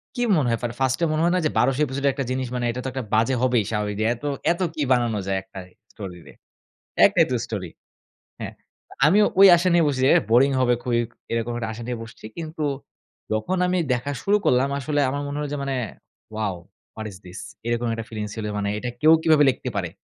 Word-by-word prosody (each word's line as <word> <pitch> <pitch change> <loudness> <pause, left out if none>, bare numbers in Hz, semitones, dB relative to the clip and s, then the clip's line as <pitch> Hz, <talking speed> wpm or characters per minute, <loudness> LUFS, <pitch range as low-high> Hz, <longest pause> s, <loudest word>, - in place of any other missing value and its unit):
কি 245 - -2 0.2
মনে 135 -5 +1
হয় 115 -1 0 0.2
ফার্স্টে 130 +5 +1
মনে 155 - 0
হয় 175 - +3
না - - +2
যে, - - +3
১২০০ 135 +1 +1
এপিসোডের 140 +1 0
একটা 135 -1 -3
জিনিস 130 -1 -2
মানে 120 -1 -1
এটা 125 - -6
তো - - -4
একটা 130 0 -4
বাজে 115 +4 +3
হবেই 125 -3 +2
স্বাভাবিক। 105 -1 -2 0.2
এত, 120 +4 -13 0.3
এত 175 - -2
কী 150 - -4
বানানো 120 -4 +2
যায় 95 0 0
একটা 95 0 -11 0.3
স্টোরিরে 90 -5 -9 0.7
একটাই - - +4
তো - - +1
স্টোরি। - - -5 0.7
হ্যাঁ, - - -6 0.5
আমিও 205 +7 +5
ওই 195 - +10
আশা 175 +2 0
নিয়ে 170 -1 +5
বসছি 135 -3 -1 0.3
বোরিং 135 +4 +5
হবে 125 -1 +3
খুবই 120 -2 +1 0.3
এরকম 115 +1 -1
একটা 115 -1 -3
আশা 115 +2 -8
নিয়ে 125 -1 -3
বসছি। 115 -1 -13
কিন্তু 160 -1 -5 0.7
যখন 110 +13 -1
আমি 180 0 +1 0.2
দেখা 125 +3 -2
শুরু 205 +1 +3
করলাম 130 +2 +3
আসলে 145 +2 -1
আমার 140 +2 -3
মনে 145 +1 -4
হল 150 - -2
যে, - - -2
মানে 135 -1 -2 0.6
Wow! 105 -4 -1 0.4
What 110 - -6
is 95 - -11
this! 90 - -9 0.3
এরকম 120 0 0
একটা 115 -1 -5
ফিলিংস 105 -2 -5
ছিল 110 -2 -4
মানে 100 -1 -1
এটা 125 +3 -4
কেউ 155 +1 +7
কিভাবে 155 -2 +5
লিখতে 130 0 -3
পারে? 90 -3 -1
125 Hz, 205 wpm, -23 LUFS, 115-145 Hz, 0.7 s, ওই